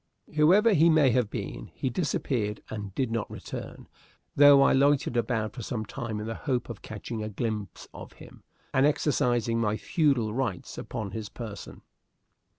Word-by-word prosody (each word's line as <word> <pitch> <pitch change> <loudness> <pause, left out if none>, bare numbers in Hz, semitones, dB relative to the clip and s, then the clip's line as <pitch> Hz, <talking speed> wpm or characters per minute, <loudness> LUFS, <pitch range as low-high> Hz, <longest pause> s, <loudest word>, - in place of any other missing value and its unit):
Whoever 185 +9 +5
he 165 -1 +5
may 155 -5 +5
have 120 -3 +1
been, - - -6
he 130 - -2
disappeared 120 - -2
and 105 -2 -5
did 130 -4 -1
not 115 -2 -2
return, - - -8 0.5
though 140 -1 +8
I - - +4
loitered 140 -2 +3
about 115 -3 -1
for 120 - -7
some 110 0 -4
time 110 0 -5
in 105 - -5
the 115 - -3
hope 125 0 -2
of 115 - -7
catching 110 +1 -6
a 110 - -4
glimpse 105 -2 -4
of - - -10
him - - -14 0.3
and 135 +1 +4
exercising 120 -6 +1
my 110 -1 0
feudal 135 - +1
rights 115 -8 -3
upon 100 -3 -5
his 105 +1 -5
person. 115 -4 -9
120 Hz, 165 wpm, -27 LUFS, 110-140 Hz, 0.5 s, though